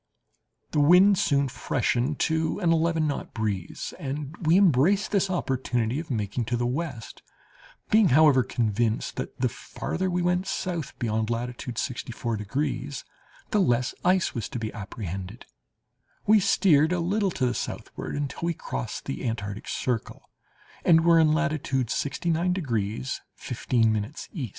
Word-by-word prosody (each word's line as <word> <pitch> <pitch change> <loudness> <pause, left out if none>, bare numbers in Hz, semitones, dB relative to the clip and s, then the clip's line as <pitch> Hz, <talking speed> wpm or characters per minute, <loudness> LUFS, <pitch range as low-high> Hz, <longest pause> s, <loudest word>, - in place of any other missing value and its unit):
"The 150 - +1
wind 180 +6 +6
soon 140 -2 +2
freshened 130 +2 -1
to 160 0 +1
an 175 -4 +2
eleven 165 -1 +2
knot 145 -2 -4
breeze, 105 -5 -3
and 145 +2 -4
we 165 +2 +4
embraced 190 - +4
this 195 -2 +2
opportunity 130 -7 -1
of 160 - -7
making 110 -1 -2
to 120 +2 -1
the 120 - 0
west; 130 -2 -4 0.7
being 215 -4 +6
however 145 -1 +6
convinced 115 -2 -1
that - - -5
the - - +2
farther 185 +2 -4
we 180 0 0
went 180 +1 +1
south 170 -6 -3
beyond 110 -1 -1
latitude 120 0 -4
sixty 125 -1 -3
four 115 0 -3
degrees, 130 +5 -3 0.5
the 210 - +3
less 125 -5 +1
ice 185 0 +2
was 115 -4 -4
to 130 - -5
be 110 -2 -4
apprehended, 100 0 -6 0.8
we 215 +1 +6
steered 170 -5 +4
a 180 - +1
little 195 +4 +1
to 135 -7 -1
the 120 - +1
southward, - - -5
until 145 -1 -3
we 170 0 0
crossed 60 - -5
the 65 - -4
Antarctic 105 -3 -4
circle, 125 -5 -3 0.5
and 165 -1 +5
were 170 -1 +6
in 155 -1 +5
latitude 155 -6 0
69 170 +4 0
degrees 120 - -2
15' 115 -1 0 0.2
E. 140 - -4
140 Hz, 150 wpm, -26 LUFS, 115-170 Hz, 0.8 s, wind